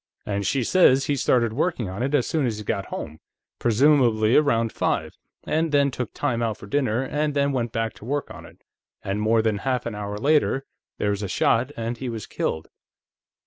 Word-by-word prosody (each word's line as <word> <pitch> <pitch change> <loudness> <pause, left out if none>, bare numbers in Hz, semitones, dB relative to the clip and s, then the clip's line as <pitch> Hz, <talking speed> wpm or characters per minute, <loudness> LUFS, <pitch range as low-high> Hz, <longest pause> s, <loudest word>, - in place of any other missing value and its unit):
And 100 -1 -2
she 135 -3 +1
says 135 -3 +4
he 145 - 0
started 120 -4 +2
working 145 - -1
on 95 +5 -5
it 140 +3 +1
as 130 - +2
soon 150 -5 0
as 110 -3 -2
he 105 - -6
got 100 -1 -2
home 80 +1 -6 0.4
presumably 120 -2 +3
around 115 -6 +3
five - - -1 0.3
and 160 0 0
then 140 -1 +3
took 125 -2 -4
time 120 -1 -1
out 115 -3 -1
for - - -11
dinner, 125 +1 0
and 150 +2 -1
then 140 0 +2
went 120 -4 -1
back 115 0 -2
to - - -12
work 145 +2 -2
on - - -10
it, - - -16 0.4
and 100 +2 -2
more 110 +1 +3
than 110 -2 0
half 125 +1 -1
an 115 - -3
hour 105 0 -5
later, 140 +1 +2 0.3
there 105 - 0
was 100 0 -2
a 100 - -2
shot 120 +7 +1
and 115 +1 -3
he 130 - -4
was 115 -3 -5
killed." 80 - -3
120 Hz, 210 wpm, -24 LUFS, 110-140 Hz, 0.4 s, says